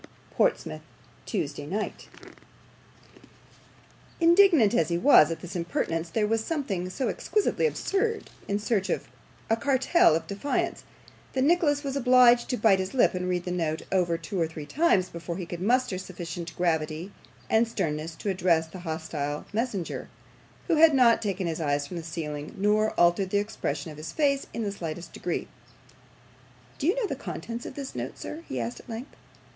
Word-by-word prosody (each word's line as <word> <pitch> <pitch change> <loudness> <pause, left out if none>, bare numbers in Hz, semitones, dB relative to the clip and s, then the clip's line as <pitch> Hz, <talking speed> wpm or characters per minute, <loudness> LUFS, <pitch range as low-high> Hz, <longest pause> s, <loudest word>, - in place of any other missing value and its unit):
"PORTSMOUTH, 75 - 0 0.5
TUESDAY 145 - -3
NIGHT." 210 +6 -4 2.1
Indignant 335 - +6
as 160 0 +2
he 170 - +1
was 175 - +7
at 165 - -4
this 180 +1 -8
impertinence, 170 -1 -2
there 210 +5 +1
was 225 +1 0
something 210 - -2
so 260 +8 -2
exquisitely 430 +2 +1
absurd 440 0 -1 0.2
in 200 - 0
such 210 -2 0
a - - 0 0.6
cartel 275 - +4
of 165 - -2
defiance, 200 +8 -2 0.5
that 260 - +1
Nicholas 300 -2 +3
was 275 -1 -3
obliged 250 -2 +5
to 250 - 0
bite 205 -4 +4
his 190 +6 -3
lip 250 - +4
and 180 0 -2
read 180 -1 -1
the 180 - -3
note 160 -3 -1
over 175 -3 +2
two 175 +2 -4
or 165 - +2
three 160 -2 -8
times 205 - +2
before 170 0 -6
he 180 - -4
could 170 0 -7
muster 240 -2 +1
sufficient 175 -2 -7
gravity 160 +1 -1 0.4
and 225 +1 +3
sternness 160 -6 -3
to 200 - -2
address 175 -3 +2
the 165 +3 -10
hostile 160 -3 -4
messenger, 215 -6 -3 0.6
who 325 - +2
had 315 -1 +7
not 240 -3 +5
taken 195 -3 -2
his 165 -1 -2
eyes 145 -1 0
from 175 +4 -7
the - - -4
ceiling, 155 -3 -5
nor 210 +2 +2
altered 175 +2 +4
the 205 - +1
expression 160 -8 -3
of 150 - -11
his 155 +1 -6
face 280 -3 +1
in 230 - -3
the 205 - -1
slightest 170 -3 -6
degree. - - -3 1.3
'Do 290 - 0
you 365 - +3
know - - 0
the - - -3
contents 235 0 -6
of - - -9
this 275 -2 -6
note, - - -5
sir?' 320 +2 -7
he 130 - -3
asked, 115 0 -4
at - - -16
length. 235 +5 -7
190 Hz, 175 wpm, -27 LUFS, 165-250 Hz, 2.1 s, was